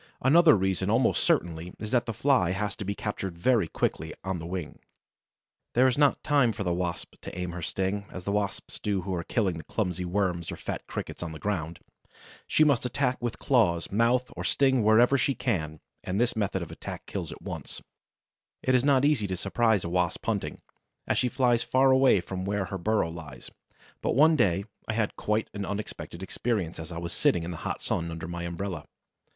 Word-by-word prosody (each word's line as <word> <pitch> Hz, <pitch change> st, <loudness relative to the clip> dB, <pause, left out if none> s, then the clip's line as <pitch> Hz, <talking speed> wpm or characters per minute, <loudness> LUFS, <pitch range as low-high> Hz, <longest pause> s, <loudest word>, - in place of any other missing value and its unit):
Another 155 Hz, +4 st, +7 dB
reason 95 Hz, 0 st, 0 dB
almost 115 Hz, +3 st, +3 dB
certainly 85 Hz, +1 st, 0 dB
is 105 Hz, 0 st, -6 dB
that 120 Hz, -1 st, +2 dB
the -, -, -1 dB
Fly 115 Hz, -6 st, +2 dB
has 105 Hz, +2 st, -2 dB
to -, -, -4 dB
be 100 Hz, +1 st, -3 dB
captured 95 Hz, -5 st, -4 dB
very 110 Hz, -1 st, +3 dB
quickly, 80 Hz, 0 st, -2 dB
on 95 Hz, -2 st, -2 dB
the 80 Hz, -, -6 dB
wing. 90 Hz, -4 st, -5 dB, 1.0 s
There 125 Hz, +2 st, +5 dB
is 125 Hz, -, +2 dB
not 145 Hz, -1 st, +3 dB
time 140 Hz, -6 st, +3 dB
for 100 Hz, -, -4 dB
the 90 Hz, -2 st, 0 dB
Wasp 90 Hz, -1 st, -3 dB
to -, -, -8 dB
aim 90 Hz, -1 st, -3 dB
her 85 Hz, 0 st, -6 dB
sting, 95 Hz, +4 st, -2 dB
as 90 Hz, -, -7 dB
the 100 Hz, -, -2 dB
Wasps 100 Hz, -2 st, -2 dB
do 100 Hz, -3 st, -1 dB
who 95 Hz, +1 st, -4 dB
are 85 Hz, -1 st, -2 dB
killing 95 Hz, -6 st, 0 dB
clumsy 90 Hz, -4 st, -1 dB
Worms 90 Hz, -2 st, -1 dB
or -, -, -4 dB
fat -, -, -5 dB
Crickets -, -, -6 dB
on 85 Hz, -2 st, -4 dB
the 80 Hz, -, -8 dB
ground. 85 Hz, -5 st, -3 dB, 0.7 s
She 155 Hz, -, +4 dB
must 140 Hz, -6 st, +3 dB
attack 125 Hz, 0 st, 0 dB
with 120 Hz, -2 st, -2 dB
claws, 95 Hz, -11 st, +2 dB
mouth 120 Hz, +4 st, +2 dB
or -, -, -5 dB
sting 130 Hz, -4 st, +3 dB
wherever 120 Hz, +6 st, +5 dB
she 140 Hz, -, +1 dB
can, 80 Hz, -, -2 dB, 0.2 s
and 95 Hz, +3 st, -2 dB
this 120 Hz, 0 st, +2 dB
method 100 Hz, -4 st, -1 dB
of 85 Hz, -, -9 dB
attack -, -, -7 dB
kills -, -, -5 dB
at -, -, -10 dB
once. -, -, -6 dB, 0.8 s
It 130 Hz, -, +2 dB
is 125 Hz, -1 st, +4 dB
not 140 Hz, -1 st, +4 dB
easy 140 Hz, -9 st, +2 dB
to 95 Hz, -1 st, -3 dB
surprise 110 Hz, +2 st, +2 dB
a 85 Hz, -, -3 dB
Wasp 90 Hz, -1 st, 0 dB
hunting, 110 Hz, -4 st, -2 dB, 0.4 s
as -, -, +1 dB
she 125 Hz, -, +2 dB
flies 120 Hz, -2 st, +2 dB
far 130 Hz, +1 st, +3 dB
away 130 Hz, -7 st, +5 dB
from 95 Hz, +1 st, -5 dB
where 100 Hz, 0 st, -1 dB
her 95 Hz, +1 st, -5 dB
burrow 105 Hz, -3 st, +1 dB
lies; 75 Hz, -7 st, -9 dB, 0.5 s
but -, -, 0 dB
one 155 Hz, +4 st, +6 dB
day 100 Hz, -, +2 dB, 0.2 s
I 115 Hz, -, -1 dB
had 110 Hz, -2 st, 0 dB
a -, -, -14 dB
quite 105 Hz, +1 st, 0 dB
unexpected 100 Hz, -3 st, -5 dB
experience 95 Hz, -4 st, -2 dB
as 80 Hz, +2 st, -7 dB
I 85 Hz, -, -5 dB
was 85 Hz, 0 st, -4 dB
sitting 85 Hz, 0 st, +2 dB
in 85 Hz, -, -4 dB
the 85 Hz, -, -6 dB
hot -, -, -4 dB
sun 85 Hz, 0 st, -1 dB
under 80 Hz, 0 st, -6 dB
my 85 Hz, 0 st, -5 dB
umbrella. 85 Hz, -2 st, -4 dB
100 Hz, 205 wpm, -28 LUFS, 85-120 Hz, 1.0 s, Another